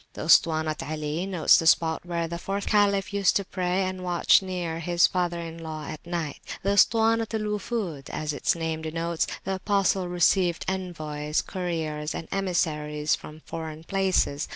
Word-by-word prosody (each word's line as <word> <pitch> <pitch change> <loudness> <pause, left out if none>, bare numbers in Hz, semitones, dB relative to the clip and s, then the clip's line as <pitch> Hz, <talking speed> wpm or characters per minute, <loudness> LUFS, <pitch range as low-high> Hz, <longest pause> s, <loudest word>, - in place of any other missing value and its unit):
The - - -6
Ustuwanat 155 -1 +3
Ali 155 +3 -3
notes 180 -4 +5
the 165 - 0
spot 160 0 +3
where 170 -1 -1
the 170 +1 -5
fourth 200 +3 -3
Caliph 200 -1 +2
used 200 -1 +3
to 200 - +1
pray 185 +1 -1
and 185 0 -4
watch 175 +1 +4
near 180 -3 -3
his 170 +1 +3
father 175 -2 0
in 165 0 -7
law 155 -2 -6
at 155 0 -7
night. 170 -5 -3 0.2
At - - -18
the 195 - 0
Ustuwanat 225 +2 +3
al 220 - -1
Wufud, 210 - -3
as 150 -1 -3
its 145 - +1
name 160 -1 -3
denotes, 165 +1 -2 0.2
the 195 - -2
Apostle 190 -1 +1
received 175 0 +2
envoys, 155 -5 -2
couriers, 160 -5 -3
and 165 - -6
emissaries 150 -6 0
from 155 +1 -6
foreign 160 -1 -6
places. 185 -6 0
170 Hz, 170 wpm, -26 LUFS, 160-190 Hz, 0.2 s, notes